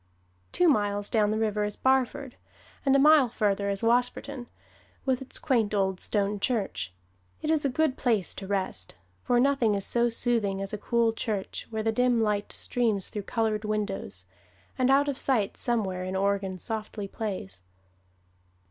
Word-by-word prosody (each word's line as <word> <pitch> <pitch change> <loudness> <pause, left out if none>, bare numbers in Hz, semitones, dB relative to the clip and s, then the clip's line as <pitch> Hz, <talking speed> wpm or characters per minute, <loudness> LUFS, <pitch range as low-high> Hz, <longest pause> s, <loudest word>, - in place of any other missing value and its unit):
Two 355 - +3
miles 205 -7 +1
down 215 -2 +3
the 215 - 0
river 215 -1 0
is 210 0 -2
Barford, 265 0 0 0.5
and 275 -1 +3
a - - +6
mile 290 -2 +6
farther 200 -3 0
is 200 +2 -2
Wasperton, 245 +2 0 0.6
with 260 -1 +1
its 265 - -6
quaint 230 -8 +1
old 190 -2 0
stone 205 -1 0
church. 195 - -2 0.5
It 310 - +1
is 310 -2 +1
a - - +3
good 285 +1 0
place 220 -8 +1
to 195 - -8
rest: 190 - -2 0.3
for 245 - +2
nothing 255 -5 +3
is 195 - 0
so 240 0 +3
soothing 225 -4 0
as 195 +1 -5
a - - -1
cool 230 +1 +1
church 210 -3 -4
where 220 -1 -3
the 225 - +1
dim 245 +1 +2
light 210 -2 0
streams 220 -6 -1
through 210 - -4
colored 220 -2 0
windows, 200 - -3 0.5
and 255 0 +1
out 280 +2 +4
of 280 -2 -2
sight 230 -7 +1
somewhere 205 -7 +1
an 185 +1 -4
organ 195 -1 0
softly 215 +1 -5
plays. 185 - -5
220 Hz, 165 wpm, -27 LUFS, 200-250 Hz, 0.6 s, a